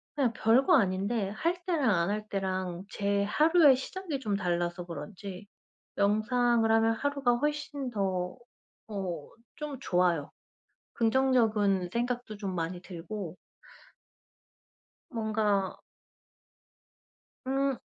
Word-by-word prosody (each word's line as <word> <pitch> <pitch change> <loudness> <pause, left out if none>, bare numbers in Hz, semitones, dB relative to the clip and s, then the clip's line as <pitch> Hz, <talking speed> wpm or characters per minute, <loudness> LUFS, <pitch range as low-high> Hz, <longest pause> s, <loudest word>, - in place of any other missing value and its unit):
그냥 265 -6 +1
별거 255 - +4
아닌데 200 0 0
할 335 - -2
때랑 320 -9 +2
안 170 +1 +1
할 210 +1 -2
때랑 185 -2 -2
제 200 -1 0
하루의 305 - +5
시작이 310 +3 -4
좀 215 -6 -1
달라서 175 -2 -1
그런지 195 +3 -8 0.5
명상을 225 +3 +2
하면 225 0 +4
하루가 280 -1 +1
훨씬 290 0 -2
더 190 -5 -2 0.5
어 185 -7 -4 0.3
좀 300 -2 -5
좋아요. 175 - +1 0.6
긍정적인 225 -6 +2
생각도 240 -2 -2
좀 195 -3 -4
많이 170 +2 -3
들고 180 0 -7 1.7
뭔가 215 -4 0 1.7
음 270 0 +1
215 Hz, 200 characters per minute, -30 LUFS, 190-260 Hz, 1.7 s, 하루의